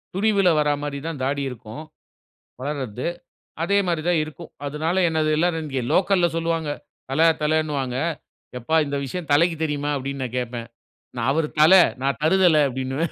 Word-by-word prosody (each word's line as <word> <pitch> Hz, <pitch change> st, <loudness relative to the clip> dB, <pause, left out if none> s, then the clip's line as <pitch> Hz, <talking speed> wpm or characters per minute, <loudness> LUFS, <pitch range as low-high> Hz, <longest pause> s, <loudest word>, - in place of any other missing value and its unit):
துணிவுல 200 Hz, -2 st, +3 dB
வர 150 Hz, 0 st, +2 dB
மாரி 145 Hz, -1 st, -4 dB
தான் 150 Hz, -5 st, -5 dB
தாடி 140 Hz, +1 st, -1 dB
இருக்கும். 120 Hz, +3 st, -9 dB, 0.8 s
வளர்றது. 130 Hz, -5 st, -4 dB, 0.6 s
அதே 200 Hz, +4 st, +2 dB
மாரி 170 Hz, -3 st, -1 dB
தான் 170 Hz, -3 st, +3 dB
இருக்கும். 155 Hz, +2 st, -11 dB, 0.2 s
அதனால 155 Hz, +5 st, -2 dB
என்னது 155 Hz, -1 st, 0 dB
எல்லாரும், 165 Hz, -1 st, 0 dB
இங்க 135 Hz, -3 st, -2 dB
லோக்கல்ல 185 Hz, -2 st, +3 dB
சொல்லுவாங்க. 165 Hz, -2 st, -1 dB, 0.4 s
தல 160 Hz, +4 st, +4 dB, 0.2 s
தலன்னுவாங்க. 150 Hz, -5 st, 0 dB, 0.6 s
"எப்பா! 160 Hz, +7 st, 0 dB
இந்த 140 Hz, 0 st, -3 dB
விஷயம் 160 Hz, +2 st, -6 dB
தலைக்கு 165 Hz, +3 st, +3 dB
தெரியுமா?" 145 Hz, -1 st, -2 dB
அப்படீன்னு 135 Hz, 0 st, -4 dB
நான் 125 Hz, 0 st, -5 dB
கேட்பேன். 120 Hz, -1 st, -4 dB, 0.5 s
நான், 120 Hz, 0 st, -2 dB
"அவரு 155 Hz, +1 st, +1 dB
தலை, 180 Hz, +4 st, +8 dB, 0.2 s
நான் 140 Hz, +1 st, 0 dB
தருதல." 170 Hz, -2 st, +4 dB
அப்டின்னுவேன். 130 Hz, +5 st, -2 dB
150 Hz, 150 wpm, -23 LUFS, 135-165 Hz, 0.8 s, தலை